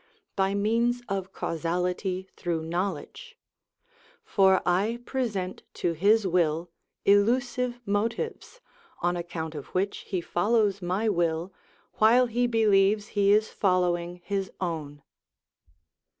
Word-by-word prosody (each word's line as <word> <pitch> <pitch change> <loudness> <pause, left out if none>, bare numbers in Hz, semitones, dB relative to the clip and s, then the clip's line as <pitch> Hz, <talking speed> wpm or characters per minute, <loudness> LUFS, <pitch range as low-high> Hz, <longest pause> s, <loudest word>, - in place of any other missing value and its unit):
_, - - -35 0.3
by 195 0 +1
means 235 +4 +1
of 195 -1 -3
causality 180 +3 -2
through 170 -3 -2
knowledge; 185 - -4 0.9
for 190 - +4
I 200 +6 +1
present 205 -8 -3
to 175 - 0
his 205 +6 +3
will 170 -2 +1 0.3
illusive 245 +4 +2
motives, 230 - -2 0.4
on 175 0 +2
account 165 -2 -5
of 145 -3 -7
which 195 +2 0
he 185 - -1
follows 200 +3 +1
my 185 +5 -1
will, 170 -2 0 0.5
while 235 +4 +6
he 245 +1 0
believes 210 -2 +3
he 200 -1 +2
is 215 +1 +3
following 180 -2 0
his 195 -1 -2
own. 150 -5 -4
195 Hz, 115 wpm, -27 LUFS, 175-220 Hz, 0.9 s, while